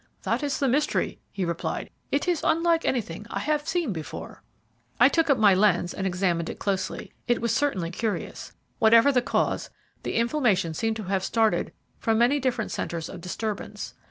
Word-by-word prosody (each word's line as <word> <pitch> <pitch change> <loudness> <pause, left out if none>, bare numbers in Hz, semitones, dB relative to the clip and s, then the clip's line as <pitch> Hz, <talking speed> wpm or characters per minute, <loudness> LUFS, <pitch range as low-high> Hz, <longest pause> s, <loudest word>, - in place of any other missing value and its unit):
"That - - 0
is 285 -2 -1
the 275 - +1
mystery," 285 +4 0
he 190 - -2
replied; 170 -1 -3 0.2
"it 285 +5 0
is 345 -3 +1
unlike 330 +1 +2
anything 210 -5 -2
I - - -4
have 300 0 -1
seen 335 - 0
before." 155 -6 -7 0.6
I 245 - +8
took 325 +1 +1
up 280 - +5
my 205 -3 +6
lens 185 -3 +3
and 195 - -2
examined 180 -2 0
it - - -6
closely. 195 -2 -3
It 240 -1 +2
was 235 -1 0
certainly 190 -13 0
curious. 220 +3 -3 0.3
Whatever 230 +3 +6
the 250 -2 +3
cause, - - 0 0.3
the - - -4
inflammation 230 - +2
seemed 225 +7 -1
to 220 - -5
have 190 0 -1
started 225 0 +1 0.3
from 225 -1 +1
many 245 +5 +4
different 250 -4 -1
centres 165 -2 -3
of 180 - -8
disturbance. 205 +4 -4
225 Hz, 180 wpm, -26 LUFS, 190-275 Hz, 0.6 s, I